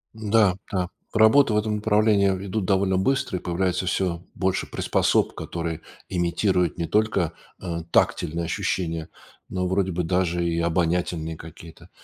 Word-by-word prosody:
М-да, 105 -3 +3 0.2
да. 90 -2 -1 0.2
Работы 110 +3 +5
в - - +2
этом 105 0 0
направлении 105 -2 +3
ведут 95 +1 -2
довольно 95 -1 +2
быстро, 115 -2 0
и - - -18
появляется 90 +1 -1
всё 90 -2 -1
больше 95 -1 -1
приспособ, - - +1
которые 85 -1 -4 0.3
имитируют 90 -1 +1
не 85 - -1
только, 100 -6 +1 0.3
э, 85 -3 -4
тактильные 85 +2 +1
ощущения, 80 -2 -2 0.4
но, 90 -1 -1
вроде 95 0 0
бы, 90 +1 -1
даже 85 0 0
и 85 0 0
обонятельные 85 -1 0
какие-то. 80 +2 -12
90 Hz, 140 wpm, -24 LUFS, 85-100 Hz, 0.4 s, Работы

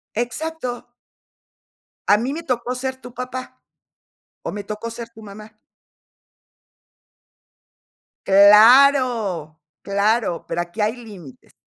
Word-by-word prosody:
Exacto. 250 +1 -4 1.2
A 205 - +5
mí 250 +5 -3
me 330 +2 -6
tocó 250 -2 -3
ser 260 +1 -4
tu 245 0 -12
papá, 255 +1 -7 0.8
o - - -4
me 205 0 -6
tocó 215 +2 -6
ser 235 0 -8
tu 225 -1 -16
mamá. 215 +1 -13 2.7
Claro, 210 - +5 0.2
claro, 200 -2 0
pero 170 - -2
aquí 175 +5 -6
hay 215 +3 0
límites. 200 - -14
230 Hz, 105 wpm, -20 LUFS, 205-250 Hz, 2.7 s, A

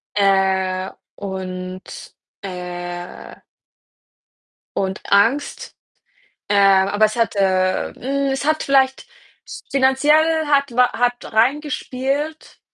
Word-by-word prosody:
äh, 190 -2 +1 0.2
und, 185 -1 -7 0.3
äh 175 -1 -7 1.4
und 190 0 -2
Angst. 230 +9 +1 0.8
Ähm, 195 -1 +4
aber 205 +2 +3
es 215 - -2
hat 230 -3 0
äh, 185 -1 +1
hm, 275 +1 -2
es 270 +1 -2
hat 310 +1 +1
vielleicht 265 -1 +2 0.4
s - - -10
finanziell 300 +4 +3
hat 280 -2 +2
wa 250 0 +4
hat 245 0 -1
reingespielt, 280 +4 -1
215 Hz, 95 wpm, -20 LUFS, 190-275 Hz, 1.4 s, Ähm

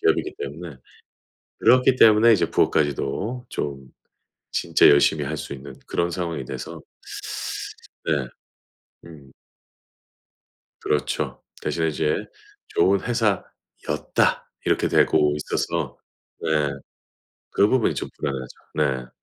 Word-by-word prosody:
기업이기 - - +1
때문에 75 +1 -7 0.8
그렇기 130 +1 +5
때문에 110 +1 +7
이제 95 - +1
부업까지도 105 - 0
좀 70 -2 -4 0.7
진짜 - - +4
열심히 70 +1 +4
할 75 +3 -3
수 - - -6
있는 70 +1 -9
그런 85 0 0
상황이 85 -5 -3
돼서 - - -7 1.3
네. 70 -5 0 0.8
음. 70 -5 -14 1.5
그렇죠. 75 -1 -1 0.2
대신에 80 -1 0
이제 75 0 0 0.5
좋은 95 0 +3
회사였다. 115 -5 -1 0.2
이렇게 - - +2
되고 75 -1 +4
있어서 75 - -2 0.4
네. 80 - -2 1.0
그 100 - +4
부분이 130 -2 +2
좀 - - -4
불안하죠. 65 -3 -4 0.5
네. 60 - -17
80 Hz, 225 characters per minute, -24 LUFS, 70-100 Hz, 1.5 s, 때문에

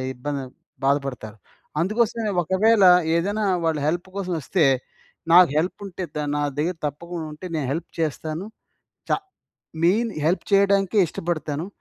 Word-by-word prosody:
ఇబ్బంది 140 +2 -4 0.4
బాధపడతారు. 135 -6 -1 0.4
అందుకోసమే 220 +3 0
ఒకవేళ 200 +5 +3 0.3
ఏదైనా 205 +5 0 0.2
వాళ్ళు 160 -2 +1
హెల్ప్ 175 +3 -1
కోసం 185 -2 -2
వస్తే, 160 +4 +2 0.7
నాకు 180 -3 +8
హెల్ప్ 170 +4 -1
ఉంటే 185 0 -6
ద - - -1 0.2
నా 145 - 0 0.2
దగ్గర 175 +4 0
తప్పకుండా 170 +3 -6
ఉంటే, 150 +5 -10
నేను 150 -4 -1
హెల్ప్ 165 +2 -5
చేస్తాను. 155 +2 -2 0.6
చ - - 0 0.7
మెయిన్ 220 +6 +3 0.2
హెల్ప్ 175 +4 +1
చేయడానికే 200 +1 +3
ఇష్టపడతాను. 155 -1 -3
175 Hz, 125 wpm, -23 LUFS, 150-195 Hz, 0.7 s, నాకు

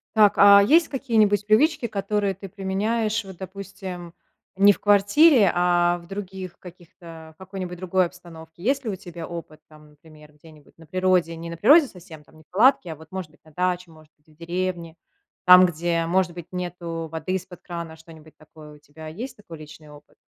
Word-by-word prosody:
Так, 210 -2 +5
а 200 0 +8
есть 320 +10 +4
какие-нибудь 215 -7 +1
привычки, 235 +4 +2
которые 200 -1 -2
ты 195 +2 -10
применяешь, 210 +3 -2
вот 190 -1 -10
допустим, 190 -2 -9 0.4
не 200 +2 +6
в - - -4
квартире, 205 - +4
а 175 0 +2
в 170 0 -15
других 190 -2 -8
каких-то 170 -2 -14
в - - -52
какой-нибудь 185 -1 -7
другой 185 +1 +1
обстановке? 170 -1 -13
Есть 270 +3 0
ли - - -2
у 200 - -3
тебя 170 -2 -9
опыт 165 -3 -9
там, 150 -1 -18
например, 150 0 -18
где-нибудь 150 0 -20
на 165 - -16
природе, 180 0 0
не 165 +1 -8
на 170 - -7
природе 285 - +6
совсем, 175 -7 -14
там 155 - -22
не 155 - -18
в - - -56
палатке, 210 -4 +3
а - - -12
вот, 160 +1 -17
может 185 -4 -6
быть, 155 - -27
на 155 - -19
даче, 180 +1 -2
может 155 -1 -19
быть, 150 - -42
в - - -30
деревне. 170 -1 -4 0.5
Там, 180 0 +8
где, 170 -1 -1
может 180 +1 +1
быть, 170 -1 -10
нету 170 -2 -5
воды 160 +3 -4
из-под 185 -1 -6
крана, 170 -2 -8
что-нибудь 160 -1 -17
такое 155 -1 -15
у - - -16
тебя, 150 +2 -13
есть 235 +10 -8
такой 170 -8 -12
личный 155 0 -13
опыт? 145 0 -17
180 Hz, 190 wpm, -23 LUFS, 160-200 Hz, 0.5 s, а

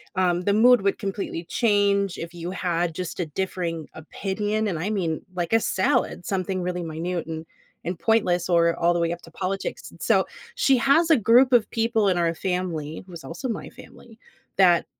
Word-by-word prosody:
Um, 180 -1 +2
the 200 - +2
mood 245 +2 +6
would 200 0 +1
completely 195 -4 -4
change 200 -1 +1
if 170 +1 -7
you 175 +1 -5
had 175 -3 -1
just 180 +1 -5
a 175 - 0
differing 170 -1 -3
opinion, 205 +6 -2
and 170 -5 -3
I 185 +6 -2
mean, 170 -7 -1
like, 175 -2 -2
a 225 - +6
salad, 190 -3 0
something 185 -1 -1
really 180 0 -3
minute, 165 +2 -3
and 160 0 -5 0.4
and 175 +1 -3
pointless, 185 -6 +2
or 170 -1 +3
all 170 +1 +3
the 175 - 0
way 170 0 +1
up 175 - -9
to 165 - -14
politics, 195 +3 -4
and - - -17
so, - - +3 0.3
she 270 -1 +3
has 280 +7 +3
a 315 - +7
group 245 +4 +5
of 235 -3 +5
people 225 -3 +1
in 185 - +2
our 170 -1 +1
family- 170 -5 -3
who - - -13
is 165 - -9
also 250 +11 -5
my 225 - -4
family- 230 -1 -15 0.4
that 180 -3 +5
185 Hz, 195 wpm, -24 LUFS, 170-210 Hz, 0.4 s, a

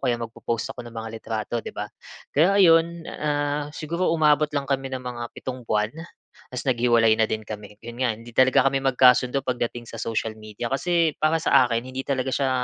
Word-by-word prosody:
kaya 120 -1 +2
magpo-post 115 0 -4
ako 125 - -9
ng 115 - -14
mga 110 0 -5
litrato, 110 +1 -3
'di - - -6
ba? 105 - -2 0.5
Kaya 180 +7 +4
ayun, 170 -2 +4
ah, 145 -1 -1
siguro 170 +3 -1
umabot 150 -2 +3
lang 140 - 0
kami 135 -1 -1
ng 130 - -3
mga 120 -1 -5
7 130 -2 -6
buwan, 105 +1 +1 0.6
ta's 125 - -4
naghiwalay 115 -2 +4
na 110 - +3
din 110 - -2
kami. 105 -1 -8
'Yon 120 0 -9
nga, 125 -2 +2
hindi 115 +2 -13
talaga 130 +1 +5
kami 135 0 -1
magkasundo 125 0 +4
pagdating 120 -1 -3
sa 115 - -8
social 110 -1 -2
media. 110 +2 -6
Kasi, 165 +2 +1
para 155 +1 +3
sa 135 -4 +5
akin 115 -1 0
hindi 130 +1 -5
talaga 130 -2 -1
siya 135 -2 +1
130 Hz, 195 wpm, -24 LUFS, 115-145 Hz, 0.6 s, talaga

